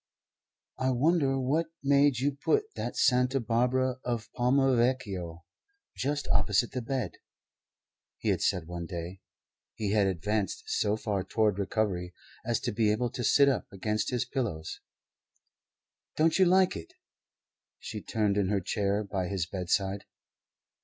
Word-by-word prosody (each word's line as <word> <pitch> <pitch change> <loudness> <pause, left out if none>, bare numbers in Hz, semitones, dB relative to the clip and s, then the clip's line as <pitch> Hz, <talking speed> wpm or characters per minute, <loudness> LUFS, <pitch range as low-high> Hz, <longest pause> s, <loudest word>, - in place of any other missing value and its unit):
"I 130 0 +1
wonder 135 +1 +2
what 150 +6 +1 0.2
made 140 -1 +4
you 140 +4 +1
put 430 - 0
that - - -4
Santa 125 0 +3
Barbara 125 +2 +1
of 120 -3 -3
Palma 130 +1 +3
Vecchio 100 -9 -1 0.5
just 145 +2 -2
opposite 105 +3 +2
the 125 - -3
bed," 130 +2 -3 1.0
he - - +1
said 90 -3 0
one 85 0 -6
day. 90 +1 -6 0.5
He 105 -3 -2
had 105 -2 +3
advanced 100 +2 -1
so 105 +1 0
far 100 -4 -2
toward 105 0 +1
recovery 95 -3 -1 0.3
as - - 0
to - - -1
be 105 0 +2
able 120 +2 0
to 125 - -4
sit 140 +4 +5
up 135 -5 +1
against 105 +2 -1
his 125 -1 -1
pillows. 115 - -3 1.4
"Don't 160 +4 +3
you 190 - +7
like 185 +1 +4
it?" 355 - -8 0.8
She - - -7
turned 105 -3 0
in 100 -2 +1
her 100 -1 +2
chair 100 +2 -1
by 95 -2 -3
his 95 -3 -1
bedside. 95 +2 -1
110 Hz, 140 wpm, -29 LUFS, 100-130 Hz, 1.4 s, you